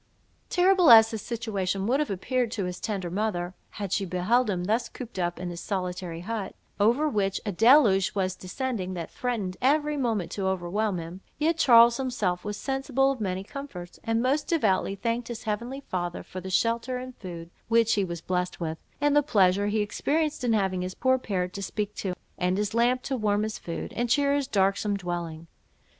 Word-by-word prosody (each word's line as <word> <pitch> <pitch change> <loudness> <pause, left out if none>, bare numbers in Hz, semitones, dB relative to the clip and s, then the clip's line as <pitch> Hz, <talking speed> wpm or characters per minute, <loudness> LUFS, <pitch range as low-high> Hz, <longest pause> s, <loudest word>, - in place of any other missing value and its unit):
Terrible 365 -2 +4
as 225 -1 +9
his 220 -2 -4
situation 200 -5 -2
would 255 +6 +2
have 300 - 0
appeared 245 +5 -1
to 200 -4 -2
his 180 0 -5
tender 195 -5 -3
mother, 185 -3 -2 0.2
had 200 -3 -5
she 200 - +1
beheld 195 +7 +1
him 180 -3 -1
thus 220 +6 0
cooped 240 -6 -8
up 175 -1 -1
in 180 -1 -4
his 170 - -6
solitary 180 -3 -3
hut, 210 0 -4 0.2
over 240 +9 +3
which 195 -7 0
a 205 - -1
deluge 220 - +5
was 185 -2 0
descending, 190 -2 -4
that 170 -2 -5
threatened 225 -8 -3
every 295 +3 +2
moment 225 -9 -1
to 195 -2 -2
overwhelm 190 +2 -1
him, 170 +3 -7 0.2
yet 325 +2 +1
Charles 235 -2 +7
himself 215 -9 -1
was 210 0 -4
sensible 270 0 +1
of 260 -4 -5
many 190 -2 -2
comforts; 195 -8 -8
and 225 0 0
most 275 +4 +1
devoutly 200 - +1
thanked 230 +4 -2
his 235 -2 -6
heavenly 235 +6 -3
Father 175 -7 -4
for 185 - -8
the 190 - -6
shelter 230 +6 +1
and 255 0 -7
food 170 -3 -8 0.2
which 230 -1 +3
he 200 - +2
was 170 -2 -5
blessed 180 +1 -2
with, 160 -2 -3 0.2
and 290 0 +2
the 295 - +6
pleasure 200 -7 +3
he 210 +1 +1
experienced 295 +8 -1
in 240 -2 +2
having 190 -3 +1
his 185 +1 -4
poor 260 0 +2
parrot 180 -6 -2
to 200 - -5
speak 210 +1 -3
to, 185 -3 -3 0.2
and 180 +1 +1
his 210 0 -1
lamp 245 +2 +2
to 270 - -2
warm 210 -3 +1
his 215 0 -4
food, 170 - -6
and 240 +1 -1
cheer 280 +3 +3
his 285 -2 0
darksome 200 -2 +1
dwelling. 170 -3 -5
210 Hz, 195 wpm, -27 LUFS, 185-245 Hz, 0.2 s, as